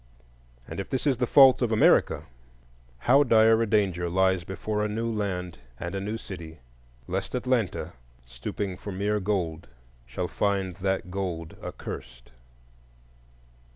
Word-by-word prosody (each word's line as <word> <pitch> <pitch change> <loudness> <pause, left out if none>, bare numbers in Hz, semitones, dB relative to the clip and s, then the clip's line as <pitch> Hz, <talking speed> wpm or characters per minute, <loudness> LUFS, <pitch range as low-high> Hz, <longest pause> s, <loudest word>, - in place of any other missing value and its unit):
And - - -6
if 95 - -5
this 130 - -2
is 135 -4 +2
the 125 0 0
fault 135 -1 +7
of 120 -2 +1
America, 110 - +4 0.7
how 130 - +4
dire 110 -3 +5
a 115 - +1
danger 95 -5 +1
lies 95 0 +2
before 105 +3 -3
a - - +1
new 115 +2 -2
land 95 -6 -3 0.2
and 85 +2 -4
a 95 - -2
new 105 +3 -3
city, 85 -7 -9 0.5
lest 95 +6 -3
Atlanta, 125 -6 -1 0.3
stooping 90 +11 -5
for 100 - -7
mere 100 +2 0
gold, 90 -5 -2 0.4
shall 90 - -3
find 95 -3 -1
that 95 -1 -2
gold 90 -4 -4
accursed! - - -8
100 Hz, 140 wpm, -27 LUFS, 90-110 Hz, 0.7 s, fault